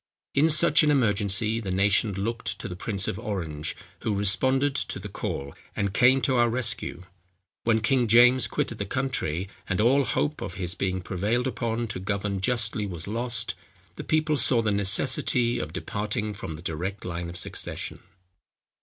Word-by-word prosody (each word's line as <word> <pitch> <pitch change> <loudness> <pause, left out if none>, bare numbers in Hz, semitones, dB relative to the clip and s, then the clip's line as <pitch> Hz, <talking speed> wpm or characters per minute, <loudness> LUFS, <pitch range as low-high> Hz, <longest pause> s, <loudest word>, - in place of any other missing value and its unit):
In 150 +4 +4
such 155 +1 +5
an 155 - +3
emergency 110 -4 +2
the 105 -4 -5
nation 100 +2 +2
looked 115 +5 -3
to - - -6
the 90 - -6
prince 100 +1 -1
of 100 - -3
Orange, 85 -9 -3 0.2
who 105 - -1
responded 130 +8 +3
to 135 - -1
the - - -7
call, 70 0 -4 0.2
and 100 -1 -1
came 130 +3 +5
to 130 +2 +1
our 120 0 +4
rescue. 115 -6 -1 0.6
When 110 -1 +3
King 125 +1 +2
James 125 +3 +6
quitted 115 - -2
the 100 - -1
country, 100 - -2 0.2
and 95 - 0
all 130 +6 +4
hope 150 +3 -1
of 90 - -5
his 90 -2 -2
being 95 -2 -2
prevailed 105 +8 -1
upon 120 -2 -2
to 100 - -4
govern 100 0 -2
justly 110 -1 0
was 85 -4 -6
lost, 120 +2 -2 0.4
the - - -6
people 155 -1 +1
saw 120 -2 +3
the 105 - +1
necessity 120 +4 +2
of 75 0 -4
departing 105 +3 -3
from 85 -5 -6
the 75 +3 -10
direct 90 +5 -4
line 85 -1 -4
of 85 - -6
succession. - - -4
105 Hz, 170 wpm, -26 LUFS, 95-125 Hz, 0.6 s, James